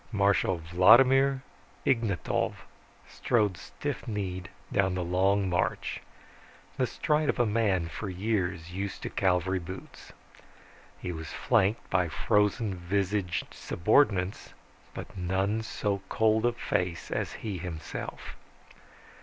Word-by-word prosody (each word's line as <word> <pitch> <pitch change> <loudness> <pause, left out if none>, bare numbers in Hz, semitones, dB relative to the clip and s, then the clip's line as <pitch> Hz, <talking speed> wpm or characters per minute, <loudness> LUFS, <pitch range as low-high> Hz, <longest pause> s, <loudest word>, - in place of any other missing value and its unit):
Marshal 100 -3 +2
Vladimir 130 +11 +5 0.4
Ignatov 115 -8 0 0.4
strode 105 -5 +1
stiff - - -6
kneed 95 -5 -3 0.2
down 95 -2 +2
the 90 - -1
long 95 +3 +2
march, 90 -1 -1 0.7
the - - +1
stride 150 0 0
of - - +1
a 120 - +3
man 105 -6 +1
for 95 +6 -5
years 90 -3 -2
used 100 +1 -4
to - - -4
cavalry 95 0 +1
boots. 90 +2 -10 0.9
He 90 - -4
was 80 -2 -6
flanked 110 -2 +1
by 90 -1 +2
frozen 105 +4 +1
visaged 95 +1 -1
subordinates, 95 -1 +1 0.4
but - - -8
none 95 +4 0
so 100 -3 -2
cold 110 +1 +3
of 120 0 -1
face 90 -1 -2
as - - -2
he 100 -5 -3
himself. 80 -2 -6
95 Hz, 115 wpm, -29 LUFS, 90-110 Hz, 0.9 s, Vladimir